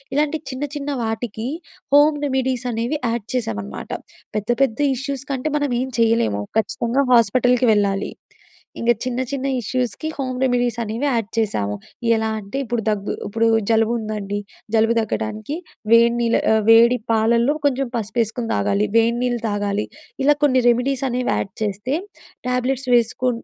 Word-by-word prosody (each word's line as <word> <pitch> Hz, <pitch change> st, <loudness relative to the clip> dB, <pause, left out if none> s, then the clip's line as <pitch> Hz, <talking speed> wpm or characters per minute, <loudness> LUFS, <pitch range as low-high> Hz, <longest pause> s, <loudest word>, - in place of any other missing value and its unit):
ఇలాంటి 300 Hz, +2 st, +1 dB
చిన్న 260 Hz, +2 st, -4 dB
చిన్న 290 Hz, 0 st, -4 dB
వాటికి 225 Hz, 0 st, -3 dB, 0.5 s
హోమ్ 295 Hz, +1 st, +6 dB
రెమెడీస్ 260 Hz, -2 st, -1 dB
అనేవి 235 Hz, +6 st, -2 dB
యాడ్ 230 Hz, -2 st, -2 dB
చేసామనమాట. 105 Hz, -, -4 dB, 0.5 s
పెద్ద, 210 Hz, +1 st, -4 dB
పెద్ద 235 Hz, -3 st, -1 dB, 0.2 s
ఇష్యూస్ 275 Hz, +1 st, -4 dB
కంటే 275 Hz, +3 st, -2 dB
మనం 290 Hz, -2 st, -1 dB
ఏం 260 Hz, -, -2 dB
చేయలేము. 225 Hz, -, +2 dB
ఖచ్చితంగా 235 Hz, +4 st, +1 dB
హాస్పిటల్‍కి 245 Hz, +1 st, +4 dB
వెళ్ళాలి. 200 Hz, -1 st, 0 dB, 0.7 s
ఇంక 235 Hz, +1 st, +3 dB
చిన్న, 255 Hz, 0 st, -2 dB
చిన్న 275 Hz, -1 st, -2 dB
ఇష్యూస్‌కి 250 Hz, +5 st, -2 dB
హోమ్ 255 Hz, -2 st, -3 dB
రెమెడీస్ 245 Hz, -2 st, +1 dB
అనేవి 225 Hz, +5 st, -3 dB
యాడ్ 230 Hz, -5 st, 0 dB
చేసాము. 105 Hz, -, 0 dB, 0.4 s
ఎలా 220 Hz, 0 st, 0 dB
అంటే 200 Hz, +5 st, -6 dB
ఇప్పుడు 240 Hz, -2 st, -2 dB
దగ్గు 205 Hz, -2 st, -1 dB
ఇప్పుడు 225 Hz, +3 st, +1 dB, 0.2 s
జలుబు 225 Hz, 0 st, +3 dB
ఉందండి. 210 Hz, -2 st, -3 dB, 0.4 s
జలుబు 225 Hz, +1 st, +4 dB
తగ్గడానికి 215 Hz, +3 st, -3 dB, 0.4 s
వేడి 235 Hz, +1 st, +6 dB
నీళ్ల 235 Hz, 0 st, +2 dB
ఆహ్, 220 Hz, -1 st, +2 dB
వేడి 235 Hz, +2 st, +7 dB, 0.2 s
పాలలో 235 Hz, +5 st, +3 dB
కొంచెం 270 Hz, -2 st, -1 dB
పసుపు 220 Hz, 0 st, -5 dB
వేసుకొని 225 Hz, +1 st, -3 dB
తాగాలి. 200 Hz, -, +1 dB
వేడి 230 Hz, +1 st, +3 dB
నీళ్లు 240 Hz, -2 st, -1 dB
తాగాలి. 205 Hz, 0 st, -1 dB, 0.4 s
ఇలా 295 Hz, +2 st, +5 dB
కొన్ని 260 Hz, -3 st, +3 dB
రెమిడీస్ 255 Hz, +3 st, +1 dB
అనేవి 250 Hz, +1 st, -1 dB
యాడ్ 195 Hz, -, -3 dB
చేస్తే 210 Hz, +6 st, -2 dB, 0.5 s
ట్యాబ్లెట్స్ 250 Hz, +1 st, -1 dB
వేసుకు 240 Hz, +2 st, +2 dB
235 Hz, 145 wpm, -21 LUFS, 220-255 Hz, 0.7 s, వేడి